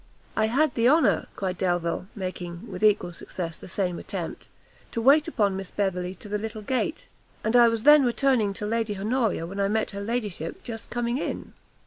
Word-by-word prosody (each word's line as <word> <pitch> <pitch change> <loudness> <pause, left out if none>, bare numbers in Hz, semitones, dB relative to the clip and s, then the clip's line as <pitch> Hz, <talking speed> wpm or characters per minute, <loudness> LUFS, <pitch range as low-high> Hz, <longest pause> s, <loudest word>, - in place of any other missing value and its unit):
"I 220 0 +2
had 275 +5 +2
the 235 +1 +4
honour," 260 - +3
cried 185 -2 -3
Delvile, 175 -1 0
making, 185 0 -5
with - - -6
equal 210 -4 +3
success, 170 -1 -6
the - - -12
same 180 -1 -2
attempt, - - -6 0.5
"to - - -1
wait 280 +7 +5
upon 205 -11 +1
Miss 190 -1 -5
Beverley 185 -2 -2
to - - -12
the 210 0 -2
little 215 0 -5
gate; 265 - -2 0.4
and 220 +2 +1
I 240 -1 +8
was 230 -1 0
then 295 0 +8
returning 245 -4 +2
to 210 +1 -5
Lady 220 -1 -1
Honoria 215 -4 0
when 195 +4 -6
I 200 - +2
met 220 +2 0
her 200 0 -5
ladyship 205 -7 -3
just 225 -2 -7
coming 240 +1 -1
in." - - -4
215 Hz, 190 wpm, -26 LUFS, 190-240 Hz, 0.5 s, I